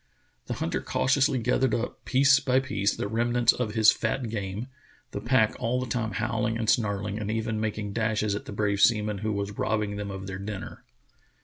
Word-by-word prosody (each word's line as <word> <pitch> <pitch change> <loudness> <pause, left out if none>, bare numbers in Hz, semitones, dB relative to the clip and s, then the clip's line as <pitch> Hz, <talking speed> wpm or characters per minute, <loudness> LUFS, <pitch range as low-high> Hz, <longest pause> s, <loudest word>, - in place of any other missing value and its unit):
The - - -3
hunter - - -2
cautiously 135 +1 +2
gathered 125 0 +1
up, 120 +1 -4
piece 135 +2 +5
by 130 -2 +2
piece, 100 -6 -1
the - - -3
remnants 120 +2 +2
of 115 -3 -3
his 110 -1 +7
fat 115 +2 -2
game, 100 +1 -4 0.5
the 100 - -5
pack 120 -1 +2
all 125 +1 0
the 130 - -2
time 110 -2 -2
howling 115 0 -1
and 115 -1 -3
snarling 105 -2 0
and 105 -1 -4
even 110 0 -1
making 105 -2 -3
dashes 110 -2 0
at 105 - -4
the - - -8
brave 100 -1 0
seaman 105 -2 +3
who 110 +1 -2
was 100 0 -4
robbing 105 -2 -1
them 105 -1 -4
of 95 0 -6
their 95 0 -6
dinner. 100 -1 -7
110 Hz, 195 wpm, -27 LUFS, 105-120 Hz, 0.5 s, his